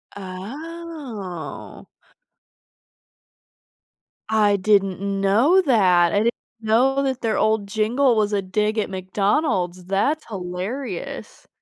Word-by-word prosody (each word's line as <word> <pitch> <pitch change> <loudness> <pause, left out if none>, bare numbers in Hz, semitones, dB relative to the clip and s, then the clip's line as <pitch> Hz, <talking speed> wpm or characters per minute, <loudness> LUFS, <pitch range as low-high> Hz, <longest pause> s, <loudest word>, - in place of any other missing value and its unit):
Oh. 220 - -8 2.4
I 210 -2 +3
didn't 195 -2 +2 0.2
know 235 - +4
that. 185 - +4
I - - +2
didn't 235 - +3 0.3
know 245 +5 +2
that 265 -2 -2
their 225 -2 0
old 215 -2 +1
jingle 230 +5 +2
was 210 -1 +1
a 200 - +1
dig 210 +3 -1
at 215 - 0
McDonald's, 185 - -1
that's 240 - 0
hilarious. 190 +3 -6
210 Hz, 100 wpm, -22 LUFS, 190-255 Hz, 2.4 s, know